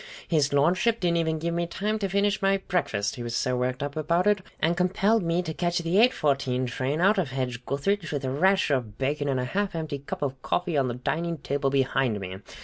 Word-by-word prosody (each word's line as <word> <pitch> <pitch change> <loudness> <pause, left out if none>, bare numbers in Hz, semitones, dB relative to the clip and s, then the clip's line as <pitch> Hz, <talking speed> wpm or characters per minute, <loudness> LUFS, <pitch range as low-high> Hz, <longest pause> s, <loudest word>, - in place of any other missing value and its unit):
His 150 -4 +2
Lordship 180 +11 +2
didn't 170 -2 +1
even 160 -1 0
give 170 +2 -2
me 170 0 -1
time 210 +5 -2
to 200 -2 -1
finish 200 +2 +1
my 195 0 +3
breakfast, 140 - -1
he - - -6
was 120 0 -3
so 125 +2 0
worked 125 +2 -1
up 145 0 -4
about 170 +4 +1
it, 210 -1 +3 0.2
and 165 +2 +2
compelled 195 +5 +2
me 170 +1 0
to 160 -2 -4
catch 175 +1 -1
the 170 +3 +1
eight 245 +3 +6
fourteen 135 - 0
train 130 +5 -2
out 195 +3 +4
of 170 -7 -1
Hedge 125 -2 -3
gutheridge, 170 +6 -1
with 145 -2 -2
a 130 - -1
rasher 185 +2 +3
of 115 -6 -2
bacon 145 +2 -1
and 130 -2 +1
a 125 - -1
half 195 +7 -2
empty 155 -3 -3
cup 140 - -5
of 135 -2 -3
coffee 175 +3 -1
on 135 -2 +2
the 120 - -3
dining 165 +6 -2
table 140 -1 -1
behind 135 -4 +1
me. 95 -1 -6
155 Hz, 235 wpm, -26 LUFS, 135-180 Hz, 0.2 s, eight